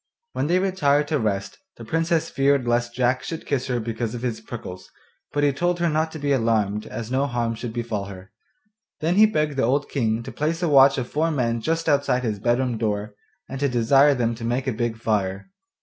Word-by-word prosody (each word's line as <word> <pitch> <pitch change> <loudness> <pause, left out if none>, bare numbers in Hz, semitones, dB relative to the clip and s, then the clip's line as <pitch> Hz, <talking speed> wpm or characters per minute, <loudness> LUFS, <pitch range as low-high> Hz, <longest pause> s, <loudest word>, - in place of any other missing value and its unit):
When - - -1
they 175 +3 +3
retired 150 -7 +2
to 155 -2 +1
rest 100 -3 -2 0.2
the - - -9
Princess 165 0 0
feared 135 -2 +2
lest 120 0 0
Jack 125 +1 +1
should 165 - -6
kiss 135 -2 -1
her 125 -2 0
because 115 0 -3
of 120 - -6
his 115 -3 -2
prickles, 95 -6 -8 0.4
but 145 - 0
he 145 -1 +3
told 175 +5 0
her 170 0 +2
not 160 +1 0
to - - -5
be 145 -1 -1
alarmed 110 -5 +1
as 115 0 -6
no 135 +2 +1
harm 120 -3 -1
should 115 +1 -6
befall 115 -4 -3
her. 95 -1 -11 0.7
Then 165 +3 +1
he 215 +3 +6
begged 150 -7 -1
the - - +2
old 140 +5 +1
King 115 -4 0
to - - -7
place 165 +4 -2
a - - +2
watch 135 -1 +6
of 125 -2 -2
four 160 +5 0
men 120 -6 0
just 165 +5 -1
outside 140 -4 +2
his 110 -4 -2
bedroom 120 +1 0
door, 105 -1 -2 0.3
and 135 - -6
to 140 0 +1
desire 135 +4 +4
them 120 -2 0
to 115 0 -9
make 120 +3 -1
a 130 - -1
big 115 0 -2
fire. 105 - -2
125 Hz, 220 wpm, -23 LUFS, 115-145 Hz, 0.7 s, he